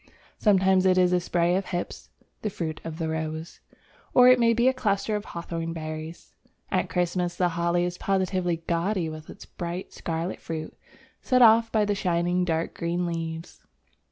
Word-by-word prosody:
Sometimes 190 -2 +4
it 185 0 +4
is 180 -1 +4
a 180 - +4
spray 175 0 +1
of 195 - -1
Hips 175 -1 -5 0.3
(the 215 - -1
fruit 160 -5 -5
of 160 -1 -6
the 165 -1 -2
Rose), 160 +1 -4 0.6
or 250 0 +8
it 255 0 +6
may 230 -1 +4
be 235 +2 +3
a 260 - +4
cluster 210 -3 0
of 210 0 -4
Hawthorn 165 -1 -5
berries. 155 0 -7 0.4
At - - 0
Christmas 175 0 -1
the 180 -1 +2
Holly 170 +1 +1
is 180 0 -4
positively 185 -3 0
gaudy 170 0 0
with 155 0 -9
its - - -11
bright 175 +2 -6
scarlet 165 +2 -3
fruit 160 -1 -6 0.5
set 255 -1 +4
off 225 0 +6
by 215 -2 +2
the 205 - +1
shining 175 -2 0
dark 165 -1 -1
green 170 +1 -2
leaves. 165 -1 -5
175 Hz, 175 wpm, -26 LUFS, 165-190 Hz, 0.6 s, or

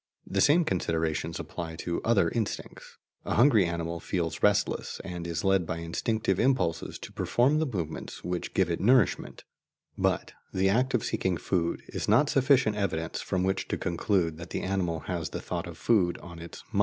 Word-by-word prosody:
The - - 0
same 160 +4 +5
considerations 80 - -1
apply 80 -1 -6
to 85 +1 -3
other 105 -6 +3
instincts. 115 -3 -4 0.3
A - - -2
hungry 115 -6 +5
animal 85 0 -3
feels 85 -2 -2
restless, 105 0 +1
and 85 -1 -5
is 85 -1 -3
led 95 -3 +2
by 85 - -2
instinctive 95 +4 -1
impulses 125 -9 +1
to - - -9
perform 135 +6 +2
the 160 - +1
movements 85 - -5
which 90 0 -4
give 95 -3 +2
it 85 - -1
nourishment; 115 - +2 0.6
but - - 0 0.2
the 95 0 +2
act 125 +6 +2
of 115 - 0
seeking 95 -2 0
food 85 -3 -1
is - - -4
not 145 0 +4
sufficient 130 -6 +3
evidence 85 -5 -2
from 90 -1 -1
which 95 +1 0
to - - -2
conclude 85 -2 0
that 85 +2 -9
the - - -3
animal 90 -4 -1
has 85 -4 -3
the - - -5
thought - - -4
of - - -9
food 95 -7 +2
in 85 -1 -10
its 85 0 -10
"mind." - - 0
95 Hz, 180 wpm, -28 LUFS, 85-110 Hz, 0.6 s, same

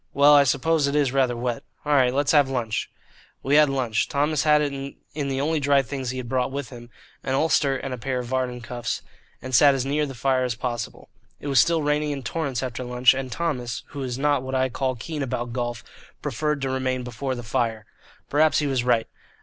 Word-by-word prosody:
Well, 145 +1 +7
I 145 -1 +7
suppose 145 +3 +2
it 140 - -1
is 145 -4 +2
rather 130 -3 +1
wet. 120 0 -2 0.2
All 150 - +1
right, 130 -3 +4
let's 140 +2 +1
have 145 -3 +4
lunch." 120 -5 -2 0.5
We 135 - 0
had 150 -1 +6
lunch. 125 -5 0
Thomas 145 +1 +1
had 150 -1 +5
it 145 -1 -1
in 140 +1 -6
the 135 -1 -2
only 155 +3 +1
dry 140 -1 +3
things 135 -1 -4
he 130 - -4
had 125 -2 -5
brought 130 +2 0
with 140 -1 -5
him 120 -1 -11 0.3
an 130 - -1
ulster 140 -2 +2
and 130 0 -5
a 125 - -6
pair 130 +2 -2
of 125 - -3
Vardon 125 -1 -2
cuffs, 120 0 -4 0.4
and 130 - -6
sat 140 +3 +6
as 130 -1 -1
near 150 +2 0
the 135 - -8
fire 130 +1 +1
as 125 -2 -1
possible. 120 -2 -5 0.3
It 145 - -5
was 135 -3 +4
still 165 +1 +3
raining 150 +1 +1
in 140 -2 -4
torrents 140 -6 -2
after 125 -1 -4
lunch, 125 +1 +4
and 130 -1 -4
Thomas, 125 -8 -3
who 145 - -7
is 125 -2 -3
not 145 -1 +2
what 130 +1 -4
I 130 0 +2
call 130 +1 -1
keen 150 +6 -5
about 120 -3 -3
golf, 120 -2 -3 0.4
preferred 150 +3 -1
to 135 - 0
remain 130 -1 -1
before 130 +2 -4
the 120 - -7
fire. 115 -2 -1 0.4
Perhaps 155 +2 +3
he 150 - +1
was 135 -4 0
right. 120 -2 +2
135 Hz, 225 wpm, -24 LUFS, 125-145 Hz, 0.5 s, Well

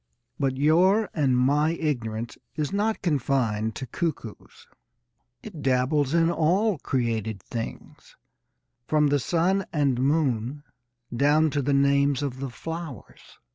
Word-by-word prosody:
But 135 -1 0
your 180 +9 +3
and 135 -6 +2
my 145 +5 +2
ignorance 120 -8 -3 0.2
is 155 +4 -2
not 215 +2 0
confined 125 - 0
to 130 - -5
cuckoos. 130 - -5 0.8
It 185 -9 -9
dabbles 135 +3 +1
in 165 0 +3
all 180 +4 +1
created 115 -6 -2
things, 115 +2 -8 0.7
from 150 -1 +3
the 145 0 +2
sun 180 +7 +1
and 140 -6 +1
moon 135 -2 0 0.5
down 150 +4 +3
to 145 0 0
the 140 +1 0
names 140 0 +2
of 130 -2 -4
the 135 0 -4
flowers. 160 - -8
145 Hz, 125 wpm, -25 LUFS, 125-160 Hz, 0.8 s, your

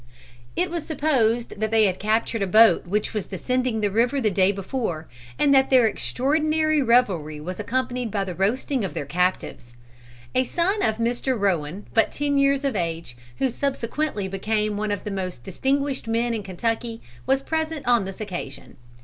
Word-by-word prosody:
It 360 -1 0
was 340 -3 -3
supposed 245 -9 0
that 220 0 0
they 220 -1 +4
had 185 -2 0
captured 220 +1 0
a 195 - +1
boat 220 0 +5
which 210 +5 -1
was 210 -4 -3
descending 250 +3 -1
the 205 -1 +1
river 240 +6 +2
the 220 -5 +1
day 190 0 +3
before, 195 -5 -4 0.3
and 280 - +4
that 265 0 +5
their 255 -3 +6
extraordinary 310 +6 +1
revelry 195 - +2
was 180 +6 -6
accompanied 250 +2 -2
by 200 -1 -1
the 185 -2 -5
roasting 230 - 0
of 190 - -4
their 145 - -3
captives. 160 -6 -2 0.6
A 255 - +3
son 370 - 0
of 220 -1 +2
Mr. 240 +2 -1
Rowan, 185 -1 -1
but 225 - +3
ten 285 -1 0
years 275 0 +2
of 270 -5 0
age, 165 -7 -3 0.2
who 265 - +1
subsequently 270 -3 -2
became 210 +2 -1
one 210 +1 -2
of 205 -1 -2
the 210 - -4
most 185 -9 -4
distinguished 275 - -1
men 230 +1 0
in 220 - -2
Kentucky, 225 +4 -3 0.3
was 270 +1 +2
present 320 -2 -2
on 240 -5 +4
this 195 0 -7
occasion. 180 -10 -7
225 Hz, 175 wpm, -24 LUFS, 195-265 Hz, 0.6 s, their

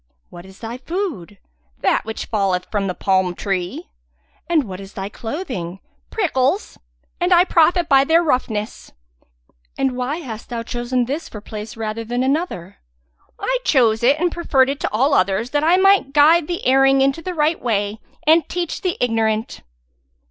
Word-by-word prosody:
"What 175 +2 -11
is 190 0 -15
thy 230 +2 -6
food?" 300 - -4 0.4
"That - - +1
which 220 0 -5
falleth 195 -4 0
from 205 -2 -1
the 180 - -3
palm 190 -2 +1
tree." 195 - -4 0.6
"And 325 -4 +3
what 190 -5 -8
is 195 0 -11
thy 195 0 -5
clothing?" 215 - -5 0.3
"Prickles! 335 -3 0 0.4
and 355 +1 0
I 350 0 +7
profit 350 0 +3
by 270 -1 +5
their 325 +4 +3
roughness." 230 -7 -2 0.8
"And 270 -1 +1
why 255 +5 -2
hast 235 -10 -8
thou 235 -2 -4
chosen 240 +1 -1
this 285 +7 -4
for 210 - -8
place 215 +1 -8
rather 220 0 -4
than 245 +3 -2
another?" 265 - -2 0.6
"I - - 0
chose 230 - +3
it 275 +5 +3
and 350 +1 +1
preferred 275 -6 +2
it 280 - -5
to - - -1
all 265 +7 +2
others 200 +2 +1
that 290 0 +1
I 340 +3 +4
might 390 -7 +4
guide 305 +2 +5
the 345 -1 -4
erring 270 +1 +4
into 275 +4 +1
the 360 +2 -5
right 310 +1 +1
way 210 -2 -1 0.2
and 320 +2 +4
teach 350 -2 -3
the 365 -2 -1
ignorant!" 225 -2 0
255 Hz, 170 wpm, -20 LUFS, 215-320 Hz, 0.8 s, I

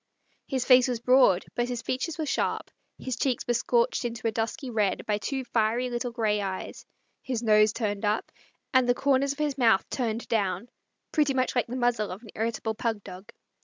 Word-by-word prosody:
His 260 -3 -1
face 255 -1 +6
was 245 -2 -2
broad, 250 -6 +4
but 240 0 -1
his 245 -2 -4
features 305 +6 -2
were 315 - -2
sharp; - - -1 0.3
his 260 -2 -4
cheeks 250 0 -1
were 240 - +1
scorched 470 - +1
into 235 -1 -5
a - - +1
dusky 225 +4 -3
red 210 -4 0
by 210 -1 0
two 265 +5 -3
fiery 240 +1 0
little 240 +1 -2
gray 215 -3 0
eyes, 190 -1 -5 0.3
his 245 -3 -3
nose 215 -1 +5
turned 210 -3 -3
up, 210 +1 0 0.4
and 255 -2 +4
the 245 - +4
corners 275 +1 +2
of - - -17
his 295 -2 -1
mouth 225 -5 +4
turned 230 -2 -2
down, 205 0 -1 0.4
pretty 295 -4 +2
much 255 0 0
like 245 - +1
the 245 - -5
muzzle 240 -4 +1
of 190 +6 -8
an 220 - -13
irritable 225 0 -2
pug 220 -2 -2
dog. 190 +5 -11
240 Hz, 200 wpm, -27 LUFS, 215-255 Hz, 0.4 s, face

